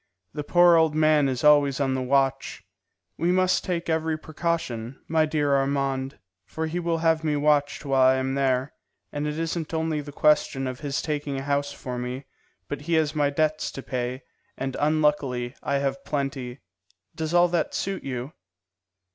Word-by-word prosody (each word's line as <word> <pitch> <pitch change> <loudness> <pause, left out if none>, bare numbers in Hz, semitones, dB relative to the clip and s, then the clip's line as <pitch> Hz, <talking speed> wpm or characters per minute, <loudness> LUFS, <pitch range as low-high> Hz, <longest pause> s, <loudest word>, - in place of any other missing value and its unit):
The 150 0 -4
poor 175 +2 +5
old 160 -2 +3
man 155 -2 +4
is 125 -2 -3
always 145 -2 +5
on 135 -2 +1
the 130 - -1
watch. 135 +1 0 0.6
We 170 +1 +2
must 185 0 +2
take 175 -2 -3
every 160 -1 0
precaution, 155 -7 -3
my 160 -1 +2
dear 145 -2 +1
Armand, 135 0 -1 0.3
for 160 - -3
he 165 +2 -3
will 170 -1 0
have 160 -1 +3
me 150 -2 +1
watched 145 0 +1
while 135 -1 +2
I 130 0 +6
am 130 0 -1
there; 135 0 0 0.4
and 145 +1 -3
it 150 +1 -3
isn't 165 0 -3
only 160 -1 -1
the 145 0 -9
question 145 -2 +2
of 130 0 -4
his 140 -2 -3
taking 145 -3 -3
a 135 - -4
house 140 0 -1
for 125 -3 -6
me, 125 +2 -5 0.4
but 145 - -5
he 170 +3 -3
has 155 -2 +2
my 145 -2 +2
debts 155 +1 0
to 135 - -7
pay, 125 +1 -3 0.3
and 135 -1 -3
unluckily 145 -5 +1
I 140 - -1
have 140 0 -1
plenty. 135 -3 -4 0.5
Does 160 +1 -3
all 175 0 +6
that 170 -2 -1
suit 195 -1 -3
you?" 130 +1 -5
145 Hz, 180 wpm, -25 LUFS, 135-160 Hz, 0.6 s, I